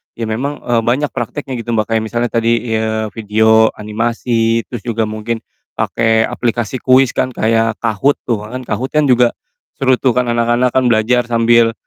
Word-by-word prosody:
ya, 115 - -5
memang, 140 +7 -3
eee, 120 -1 +1
banyak 140 +4 +1
prakteknya, 135 -4 -5
gitu, 115 0 -4
Mbak, 110 0 -1
kayak 110 -1 +1
misalnya 120 +2 -1
tadi, 115 -1 +1
eee, 110 -1 -2
video 110 +2 +3
animasi, 115 +1 -1
terus 120 - -4
juga 115 -1 0
mungkin 110 +1 -4 0.3
pake 115 -1 +1
aplikasi 120 +1 -2
kuis 130 0 +4
kan, 130 - 0
kayak 115 0 +1
Kahoot 115 +5 +1
tuh 105 -3 -2
kan, 130 +3 -6
Kahoot 130 +1 -3
kan 150 - +4
juga 125 -1 +4 0.4
seru 130 -1 +2
tuh, 130 -3 +2
kan 125 -1 +1
anak-anak 120 +1 +1
kan 130 - +2
belajar 120 +2 +2
sambil, 115 -1 +3
115 Hz, 170 wpm, -16 LUFS, 110-125 Hz, 0.4 s, kuis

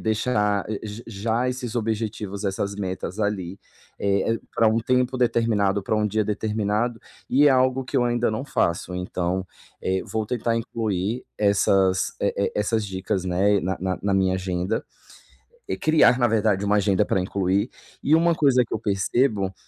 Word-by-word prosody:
deixar 105 -2 0 0.2
j 110 +2 -7
já 115 +3 -1
esses 125 -2 -4
objetivos, 110 -3 -3
essas 100 +1 -2
metas 95 0 -4
ali, 100 -3 -2 0.4
eh, 100 +3 +1 0.2
para 115 - +4
um 110 +1 +2
tempo 125 +2 +1
determinado, 110 -5 +1
para 110 - 0
um 105 0 +1
dia 110 +1 0
determinado, 110 +2 -1 0.3
e 140 +3 +4
é - - +7
algo 130 0 +2
que 130 - -3
eu 125 - +3
ainda 120 -1 +1
não 110 +5 -3
faço, 90 - -1
então, 90 +1 -2 0.3
eh, 95 0 -1
vou 110 -1 -1
tentar 115 0 -1
incluir 110 -1 -2
essas, 95 -2 +2
eh - - 0
eh, 100 - 0
essas 105 +1 0
dicas, 95 -1 -3
né, 95 +3 +2
na 95 +1 -2
na 95 0 -2
na 100 0 0
minha 95 -1 +2
agenda, 95 +2 -2 0.8
e - - -2
criar, 155 -5 +4
na 120 -2 +3
verdade, 105 -3 +1
uma 100 +1 +2
agenda 100 0 +2
para 95 - 0
incluir, 95 +4 0 0.3
e 155 - +4
uma 170 +1 +4
coisa 135 -5 +4
que - - -6
eu - - -1
percebo 100 0 0
105 Hz, 170 wpm, -24 LUFS, 95-115 Hz, 0.8 s, é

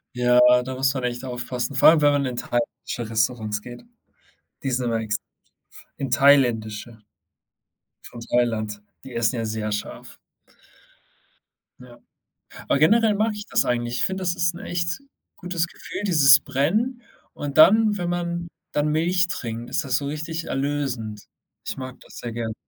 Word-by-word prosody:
Ja, 125 0 +4 0.2
da 130 +1 -5
muss 135 +1 +1
man 130 - -3
echt 120 +1 -3
aufpassen, 125 +1 -4
vor 135 - +7
allem, 160 -1 +4
wenn 145 0 +5
man 145 -1 +1
in 125 -2 -3
thailändische 120 -1 -3
Restaurants 110 -1 0
geht. 120 +2 -11 0.8
Die 135 - -1
sind 125 0 0
immer 115 -1 0
ex 105 -2 -1 0.8
in 135 -2 -3
thailändische 120 -5 +2 1.1
von 120 - -11
Thailand. 110 -3 -1 0.2
Die 130 - -10
essen 115 +1 +1
ja 115 -1 -2
sehr 110 0 -3
scharf. 105 - -7 1.6
Ja. 125 -1 -14 0.7
Aber - - +2
generell 215 +8 +4
mag 215 +2 +1
ich 210 0 -8
das - - +2
eigentlich. 120 0 -1
Ich - - +1
finde, 190 0 -2
das 175 -1 0
ist 170 -1 0
'n 170 - -9
echt 170 +4 -2 0.4
gutes 175 -2 -2
Gefühl, 170 - -8
dieses 140 -6 +7
Brennen. 210 - -1 0.3
Und 145 +1 -4
dann, 215 +5 +6
wenn 175 - -2
man 175 -1 -3 0.2
dann 145 +1 +1
Milch 175 +4 +2
trinkt, 115 -4 -5
ist - - -1
das 130 -1 +1
so 140 - -5
richtig 160 +3 -4
erlösend. 135 -7 -3 0.4
Ich - - -3
mag 130 -1 -7
das - - -15
sehr 120 -1 -6
gerne. 115 -1 -4
130 Hz, 160 wpm, -23 LUFS, 120-170 Hz, 1.6 s, vor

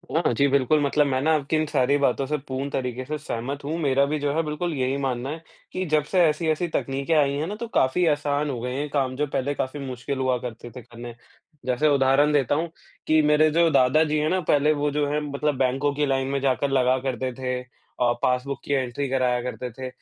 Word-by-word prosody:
हाँ 165 -4 +2
जी, 140 +5 +3
बिल्कुल 140 +2 +3
मतलब 145 +1 +2
मैं 130 -1 0
ना 155 +3 +2
आपकी 145 +1 -1
इन 155 0 +1
सारी 140 0 +2
बातों 135 -1 +1
से 150 +2 -1
पूर्ण 135 +1 -3
तरीक़े 130 -1 -3
से 150 +3 -3
सहमत 140 0 -5
हूँ, 155 +4 -3
मेरा 140 -2 +2
भी 150 +2 -2
जो 145 0 -1
है 165 - +1
बिल्कुल 155 +3 -3
यही 130 -1 -1
मानना 130 -1 -2
है 155 +2 -6 0.3
कि 185 - -2
जब 155 -2 +2
से 185 -2 +4
ऐसी-ऐसी 155 +2 0
तकनीके 135 +4 -1
आई 145 -3 +3
हैं 155 +3 -2
ना, 205 - -4
तो 235 +2 -6
काफ़ी 175 - +2
आसान 145 -1 0
हो 130 -4 -3
गए 125 0 -3
हैं 145 +2 -2
काम 135 -3 -1
जो 150 +2 -1
पहले 140 +1 -1
काफ़ी 130 +3 -3
मुश्किल 135 0 -5
हुआ 130 -1 +1
करते 120 -1 -7
थे 125 - -7
करने। 120 0 -10 0.5
जैसे 130 +4 +1
उदाहरण 135 +2 +3
देता 145 -2 +2
हूँ, 165 +2 -1 0.4
कि 155 0 +4
मेरे 150 +1 +4
जो 170 +1 +4
दादाजी 150 +3 +3
हैं 155 - +1
ना 185 - +1
पहले 150 +1 +4
वो 145 0 -1
जो 145 0 0
हैं 150 - +1
मतलब 145 -1 -2
बैंकों 135 +2 +1
की 150 +1 +1
लाइन 135 -1 0
में 140 0 -1
जाकर 135 +1 +1
लगा 130 -1 +3
करते 130 0 -2
थे 125 -1 -2 0.4
अ, 120 -1 +4
पासबुक 130 +2 0
की 145 - -1
एंट्री 135 +1 -1
कराया 125 -2 +1
करते 125 0 -5
थे। 130 +3 -7
140 Hz, 230 wpm, -24 LUFS, 130-150 Hz, 0.5 s, से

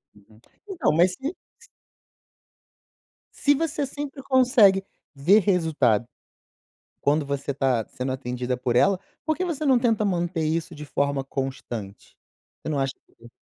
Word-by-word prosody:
Uhum. 105 +1 -21 0.3
Então, 380 -4 0
mas 175 +4 +4
se 270 - -5 0.3
s - - -16 1.7
se 290 - +3
você 295 -1 -1
sempre 280 0 -6
consegue 245 -8 +4 0.3
ver 170 +9 +5
resultado 155 - +2 0.9
quando 145 +1 +1
você 140 0 -2
tá 130 -5 0
sendo 130 +1 -4
atendida 125 -1 -3
por 125 -1 -1
ela, 190 +9 +4 0.3
por 315 -1 +1
que 370 - -1
você 320 -4 -3
não 260 -3 +5
tenta 230 -3 +1
manter 175 -3 -1
isso 165 +2 -2
de 150 0 -8
forma 140 0 0
constante? 130 -7 -6 0.5
Você - - -6
não 145 - -1
acha 135 0 -1
que - - -36
seria 120 +1 -16
155 Hz, 145 wpm, -25 LUFS, -, 1.7 s, ver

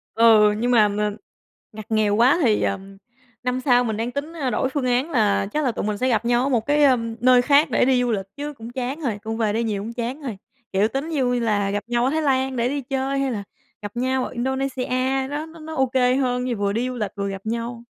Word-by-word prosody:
Ừ, 220 -2 +6
nhưng 240 +2 0
mà 220 -4 +5
mà 210 +1 -1 0.6
ngặt 215 -1 -9
nghèo 215 -2 +2
quá 255 +9 +4
thì, 220 -5 +3
ờm, 195 0 -3 0.5
năm 250 +1 -1
sau 250 -2 +3
mình 220 -3 -2
đang 230 +2 -2
tính, 285 +4 -4
a, 290 -6 -2
đổi 260 - 0
phương 270 0 -2
án 250 +6 +1
là 210 -6 +2
chắc 300 -1 0
là 250 - +1
tụi - - -4
mình 210 -1 -2
sẽ 255 - +1
gặp 230 -2 +1
nhau 240 +1 +2
ở 275 - +1
1 235 -5 0
cái, 290 0 +3
ừm, 230 -4 +2
nơi 250 0 +5
khác 285 +3 +4
để - - +3
đi 255 -1 +3
du 245 - 0
lịch 195 -2 -2
chứ 290 +1 -5
cũng 230 -2 -9
chán 260 +4 -4
rồi, 235 -9 -2
cũng 225 0 -4
về 220 -2 0
đây 230 +2 -1
nhiều 205 -3 -2
cũng 225 +3 -6
chán 245 +5 -4
rồi, 235 -8 -5 0.3
kiểu, 200 +3 +2
tính 275 +7 -4
vui 245 -3 +1
là 205 -3 0
gặp 205 0 -2
nhau 240 0 0
ở 260 - +2
Thái 315 +2 0
Lan 265 -2 +1
để 235 +1 +1
đi 280 +1 -2
chơi 270 +1 -2
hay 275 - 0
là 205 -3 -4 0.4
gặp 205 +2 -7
nhau 260 +1 0
ở - - -5
Indonesia, 265 +1 -1
đó, 295 +2 -4
nó 325 0 -14
nó 315 +1 -7
ô 265 - +3
kê 255 0 +2
hơn, 250 -2 0
như 245 -3 -2
vừa 200 0 0
đi 235 +4 -1
du 255 - -5
lịch 210 -4 -2
vừa 200 0 -2
gặp 195 +1 -8
nhau. 235 +1 -4
245 Hz, 265 wpm, -22 LUFS, 220-265 Hz, 0.6 s, Ừ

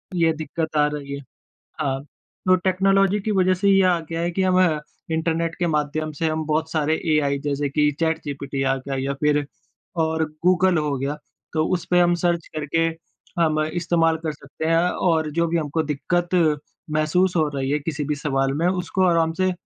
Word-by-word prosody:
ये 165 -2 +3
दिक्कत 160 +1 -4
आ 150 - +5
रही 140 -1 -5
है। 140 - -7 0.6
हाँ, 135 -3 -1
तो 185 +5 -2
टेक्नोलॉजी 195 +2 +2
की 215 +2 -2
वजह 185 -2 +3
से 195 +2 +1
ये 195 0 +5
आ 175 -2 +3
गया 165 0 -2
है 175 +1 0
कि 190 - -1
हम 185 0 +3 0.5
इंटरनेट 165 +1 0
के 175 - +1
माध्यम 155 0 -1
से 160 +2 -2
हम 155 0 -2
बहुत 155 +1 -1
सारे 155 0 +1 0.2
एआई 140 -2 +1
जैसे 145 0 -1
कि 150 +1 +2
चैट 160 0 +1
जीपीटी 140 -1 -4
आ 135 0 +2
गया 135 +1 -5
या 135 +1 -1
फ़िर 150 +1 +1 0.6
और 160 0 0 0.2
गूगल 185 0 +4
हो 150 -2 0
गया। 140 +3 -3 0.4
तो 155 0 +1
उस 175 0 -1
पे 180 - +5
हम 175 0 +4
सर्च 170 -2 +1
करके 155 +2 0 0.6
हम 155 -2 +2
इस्तेमाल 165 0 +1
कर 155 - 0
सकते 145 +2 -8
हैं 165 - +3 0.3
और 160 -2 +1
जो 170 +2 +1
भी 170 +1 0
हमको 160 0 -1
दिक्कत 170 +4 -1 0.6
महसूस 155 +5 +2
हो 160 -2 +3
रही 135 0 -1
है 150 - +1
किसी 150 0 -3
भी 150 - -1
सवाल 135 -2 0
में 175 - +4
उसको 185 +1 0
आराम 165 -2 +2
से 185 0 +3
160 Hz, 195 wpm, -23 LUFS, 150-175 Hz, 0.6 s, आ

